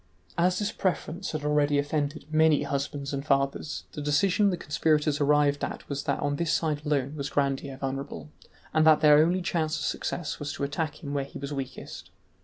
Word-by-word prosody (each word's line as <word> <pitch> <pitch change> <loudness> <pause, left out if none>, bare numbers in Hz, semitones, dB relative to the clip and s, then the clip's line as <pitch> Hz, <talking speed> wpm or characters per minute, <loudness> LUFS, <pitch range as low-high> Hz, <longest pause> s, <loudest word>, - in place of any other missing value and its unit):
As 180 +1 +2
this 205 +1 -1
preference 185 -2 -2
had 155 -2 -4
already 150 -1 +2
offended 145 +1 -1
many 155 -2 +4
husbands 140 0 -3
and 140 0 -2
fathers, 140 +1 0
the 150 - -6
decision 190 +7 +3
the 180 - -1
conspirators 150 -1 +1
arrived 145 0 +3
at - - -4
was 140 -1 -4
that - - 0
on 145 0 0
this 170 0 0
side 150 -2 0
alone 140 -1 0
was 140 -1 -3
Grandier 140 -1 -1
vulnerable, 135 +2 -5 0.4
and 155 0 +4
that 155 -1 +6
their 150 -1 +7
only 175 +4 +3
chance 160 -3 0
of - - -3
success 170 -5 -3
was 145 -1 -4
to - - -5
attack 150 +3 -3
him 140 -1 -4
where 140 -1 -1
he 140 - -10
was 140 +1 -5
weakest. 135 -2 -7
150 Hz, 195 wpm, -27 LUFS, 140-155 Hz, 0.4 s, their